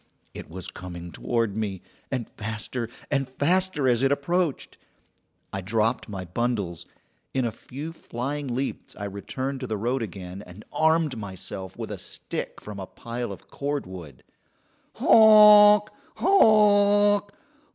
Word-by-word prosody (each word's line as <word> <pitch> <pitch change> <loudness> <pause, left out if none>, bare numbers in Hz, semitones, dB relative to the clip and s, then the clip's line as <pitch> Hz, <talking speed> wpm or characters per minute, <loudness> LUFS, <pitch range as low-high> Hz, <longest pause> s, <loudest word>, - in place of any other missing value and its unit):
It - - -9
was 90 +2 -8
coming 85 -2 -8
toward 115 -1 -1
me, 100 -4 -3 0.3
and 125 -4 -2
faster 110 +2 -5 0.2
and 135 -2 0
faster 155 +2 +1
as 120 -1 +3
it 135 0 +3
approached. 165 +2 -1 0.7
I 95 - -3
dropped 110 +4 0
my 95 -3 -5
bundles. 95 -4 -2 0.5
In 130 -2 +1
a 115 - -1
few 145 +8 -8
flying 140 0 -5
leaps 135 +2 -4
I 100 - -7
returned 130 +7 -4
to 130 - -5
the 110 -2 -2
road 120 +5 -1
again, 95 -2 -7
and 90 +3 -13
armed 160 -5 +2
myself 95 -2 -7
with - - -6
a - - -5
stick - - -6
from 105 -1 -9
a 95 - -6
pile 120 -1 -6
of 95 - -10
cordwood. 95 - -5 0.7
"Honk! 210 -1 +8 0.2
honk! 205 - +4
120 Hz, 135 wpm, -25 LUFS, 100-155 Hz, 0.7 s, Honk